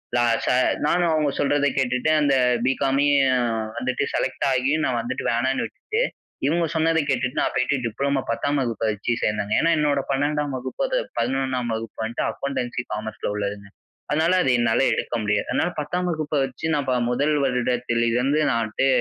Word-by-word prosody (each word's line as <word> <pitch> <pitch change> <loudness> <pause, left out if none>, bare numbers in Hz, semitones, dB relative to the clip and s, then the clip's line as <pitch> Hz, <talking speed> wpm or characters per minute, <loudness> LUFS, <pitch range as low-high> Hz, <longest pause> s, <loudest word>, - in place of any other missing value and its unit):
லா 120 0 +3 0.2
ச - - 0 0.4
நானும் 170 +2 +2
அவங்க 155 -2 +2
சொல்றத 145 0 +2
கேட்டுட்டு 125 +2 +1
அந்த 145 -2 +3 0.3
பி.காமையும் 135 +1 +3 0.5
வந்துட்டு 130 +1 -1
செலக்ட் 130 - -1
ஆகியும் 135 +5 +1
நான் 125 -2 0
வந்துட்டு 120 +3 -4
வேணான்னு 130 +3 0
விட்டுட்டு. 435 +2 -3 0.4
இவங்க 165 +4 +2
சொன்னத 160 0 +2
கேட்டுட்டு 125 0 0
நான் - - 0
போய்ட்டு 130 +3 +1
டிப்ளமோ 140 +4 -1
10 145 +5 0
வகுப்பை 115 -3 -2
வச்சு 105 +3 -3
சேர்ந்தங்க. 105 -1 0
ஏன்னா, 165 - +3
என்னோட 145 -2 +2
12 145 +1 0
வகுப்பு 130 +1 -4
அத - - 0 0.2
11 130 0 -1
வகுப்பு 110 -1 -6
வந்துட்டு 115 +2 -2
அக்கவுண்டன்சி 125 -3 -3
காமர்ஸ்ல 110 0 -4
உள்ளதுங்க. 100 0 -4 0.4
அதனால, 160 +4 +2
அது 130 - +2
என்னால 120 -1 +2
எடுக்க 115 - -2
முடியாது. 105 0 0
அதனால 175 - +1
10 180 +5 -2
வகுப்பை 155 -2 -2
வச்சு 135 +4 -5
நான் 145 -2 -2
ப - - +2 0.2
1 145 +5 +1
வருடத்துல 125 -2 0
இருந்து 135 +5 +2
நான் 115 -3 +1
வந்துட்டு 110 +5 0
135 Hz, 165 wpm, -23 LUFS, 120-145 Hz, 0.5 s, லா